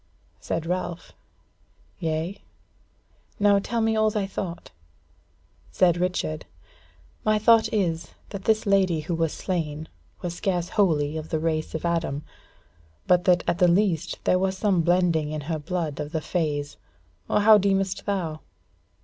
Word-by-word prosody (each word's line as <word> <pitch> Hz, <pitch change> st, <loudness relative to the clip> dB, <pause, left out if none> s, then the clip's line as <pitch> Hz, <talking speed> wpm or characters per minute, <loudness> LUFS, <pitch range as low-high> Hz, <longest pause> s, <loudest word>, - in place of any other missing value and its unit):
Said 165 Hz, 0 st, -3 dB
Ralph: 175 Hz, 0 st, -4 dB, 0.9 s
"Yea? 165 Hz, +3 st, -2 dB, 1.0 s
now 205 Hz, -1 st, +5 dB
tell 230 Hz, +3 st, -2 dB
me 225 Hz, 0 st, +2 dB
all 215 Hz, 0 st, +3 dB
thy 210 Hz, -2 st, -1 dB
thought." 185 Hz, -3 st, -6 dB, 1.0 s
Said 175 Hz, -3 st, +3 dB
Richard: 175 Hz, -, -2 dB, 0.8 s
"My 215 Hz, 0 st, +3 dB
thought 225 Hz, +1 st, +4 dB
is 170 Hz, -6 st, -1 dB
that 200 Hz, -2 st, -7 dB
this 220 Hz, -1 st, +2 dB
lady 190 Hz, -5 st, +2 dB
who 165 Hz, +3 st, -4 dB
was 165 Hz, -1 st, 0 dB
slain, 160 Hz, -4 st, -3 dB, 0.4 s
was 175 Hz, -1 st, -2 dB
scarce 175 Hz, -2 st, -1 dB
wholly 155 Hz, -6 st, +1 dB
of 155 Hz, 0 st, -6 dB
the 160 Hz, -, 0 dB
race 155 Hz, 0 st, -2 dB
of 160 Hz, -, -3 dB
Adam; 165 Hz, -4 st, -1 dB, 0.8 s
but 180 Hz, -1 st, +3 dB
that 180 Hz, -2 st, +4 dB
at 175 Hz, -, 0 dB
the 180 Hz, -, +5 dB
least 175 Hz, -2 st, +1 dB
there 185 Hz, -, +3 dB
was 190 Hz, 0 st, 0 dB
some 190 Hz, -4 st, +2 dB
blending 170 Hz, -3 st, +2 dB
in 155 Hz, 0 st, -4 dB
her 160 Hz, +2 st, -3 dB
of 150 Hz, -, -12 dB
the -, -, -21 dB
blood 165 Hz, -6 st, -2 dB
of 150 Hz, +2 st, -5 dB
the 160 Hz, -, -1 dB
fays. 150 Hz, -4 st, -2 dB, 0.5 s
Or -, -, +3 dB
how 215 Hz, 0 st, +7 dB
deemest 195 Hz, 0 st, 0 dB
thou?" 170 Hz, -6 st, -2 dB
175 Hz, 155 wpm, -25 LUFS, 160-195 Hz, 1.0 s, how